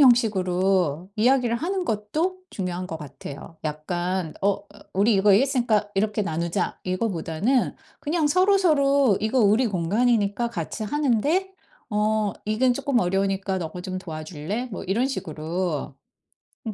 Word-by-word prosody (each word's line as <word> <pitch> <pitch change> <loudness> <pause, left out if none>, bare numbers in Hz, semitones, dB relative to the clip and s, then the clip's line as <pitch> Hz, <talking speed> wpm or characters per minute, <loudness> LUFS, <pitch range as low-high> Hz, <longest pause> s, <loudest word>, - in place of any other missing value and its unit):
형식으로 190 - +3
이야기를 240 +1 +3
하는 365 +5 -2
것도 310 - -1
중요한 180 -1 -3
것 160 -2 -6
같아요. 145 +2 -9
약간 175 +3 -2
"어 200 0 +2 0.3
우리 205 +4 +3
이거 195 +1 +5
이랬으니까 235 -2 +2
이렇게 210 +2 0
나누자." 170 -2 -1
이거보다는 185 +4 0 0.3
그냥 315 +1 0
서로서로 295 - +4
"이거 220 +5 +1
우리 215 +4 +4
공간이니까 210 +4 +1
같이 205 +2 -4
하는데 295 - +1 0.4
어 210 -2 +1
이건 245 +4 +2
쪼끔 275 -1 +1
어려우니까 195 +1 0
너가 175 0 -5
좀 185 +1 -5
도와줄래?" 170 +5 -5
뭐 195 - -6
이런 220 +8 +1
식으로. 165 - -3 0.7
음. 220 - -2
205 Hz, 310 characters per minute, -24 LUFS, 180-250 Hz, 0.7 s, 이거